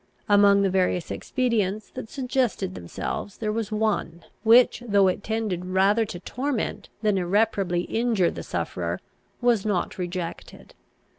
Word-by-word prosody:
Among 200 -1 +5
the 195 - +3
various 180 -2 0
expedients 215 -5 -1
that 220 - -7
suggested 255 - -1
themselves, 90 - -5
there 215 -1 -2
was 220 0 -3
one, 210 -6 -1 0.2
which, 235 +3 +5
though 200 -2 +4
it 185 +2 -1
tended 215 -5 -2
rather 195 +4 +3
to 175 - -7
torment 255 +5 -3
than 210 -3 +2
irreparably 190 -1 +1
injure 220 -3 +1
the - - -7
sufferer, - - -3 0.4
was 240 -4 +3
not 195 -3 -1
rejected. 175 -1 -6
205 Hz, 135 wpm, -25 LUFS, 185-225 Hz, 0.4 s, Among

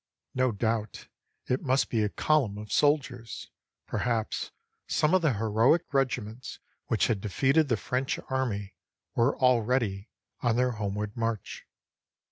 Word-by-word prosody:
No 130 -1 +2
doubt 110 0 -2 0.4
it 125 - 0
must 135 -2 +2
be 115 - +1
a 105 - +1
column 130 -6 +1
of 105 -1 -8
soldiers; 135 -5 0 0.3
perhaps 115 -3 -1 0.4
some 150 +3 +2
of 185 - +5
the 155 -6 +2
heroic 115 +9 +3
regiments 125 -3 -1 0.3
which - - +2
had 105 -4 0
defeated 135 +9 +2
the 120 -4 +1
French 130 +4 -1
army 105 -8 -2 0.4
were 120 +4 +2
already 120 -5 +2 0.3
on 120 -2 +2
their 125 +1 +2
homeward 105 -1 -3
march. 115 -2 -3
120 Hz, 130 wpm, -28 LUFS, 105-130 Hz, 0.4 s, of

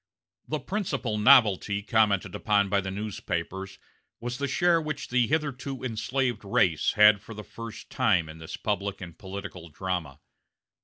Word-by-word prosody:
The 155 - -2
principal 140 - -2
novelty 105 -4 +5
commented 105 -4 +2
upon 100 -1 +1
by 100 0 +2
the 95 - -5
newspapers 95 -2 -4 0.4
was 120 +1 -5
the 140 - -1
share 170 +5 +3
which 155 -2 -5
the 125 -2 +2
hitherto 140 -4 -2
enslaved 120 0 -1
race 90 -5 +2
had 105 -1 +6
for 115 - -10
the 105 - -7
first 115 0 -9
time 105 - +2
in 80 +1 -10
this 80 - -7
public 100 -1 -2
and 85 -3 -9
political 95 -2 -8
drama. 80 -4 -4
105 Hz, 150 wpm, -27 LUFS, 95-125 Hz, 0.4 s, had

